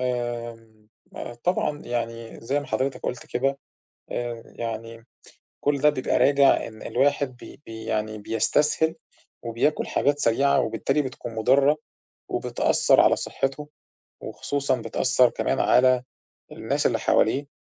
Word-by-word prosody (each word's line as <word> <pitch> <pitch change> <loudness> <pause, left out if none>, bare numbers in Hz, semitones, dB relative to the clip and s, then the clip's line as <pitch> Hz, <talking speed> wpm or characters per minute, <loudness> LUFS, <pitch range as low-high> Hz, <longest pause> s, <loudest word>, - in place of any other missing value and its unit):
آمم، 120 -3 -4 0.3
آآ، 120 - -6
طبعًا 150 +2 -1
يعني 115 -1 -4
زي 135 +5 -1
ما 145 - -9
حضرتك 135 -2 -2
قُلت 125 - -4
كده 135 +2 -1 0.5
آآ 120 -1 -4
يعني 115 0 -6 0.6
كل 145 -1 +1
ده 150 +1 +5
بيبقى 130 -3 0
راجع 140 -1 +4
إن 110 -1 -11
الواحد 135 0 0
بي - - -13
بي 110 0 -8
يعني 110 0 -2
بيستسهل 150 +9 +1 0.5
وبياكُل 115 +6 0
حاجات 145 0 +1
سريعة 140 +3 +3
وبالتالي 135 +3 0
بتكون 120 -3 -7
مُضرّة 135 +6 +3 0.5
وبتأثّر - - +2
على - - +4
صحّته 135 +2 -3 0.5
وخصوصًا 140 -2 -2
بتأثّر 130 -1 +2
كمان - - -1
على 125 0 +4 0.5
الناس - - -2
اللي - - -1
حواليه. 140 +6 +2
125 Hz, 125 wpm, -25 LUFS, 115-140 Hz, 0.6 s, ده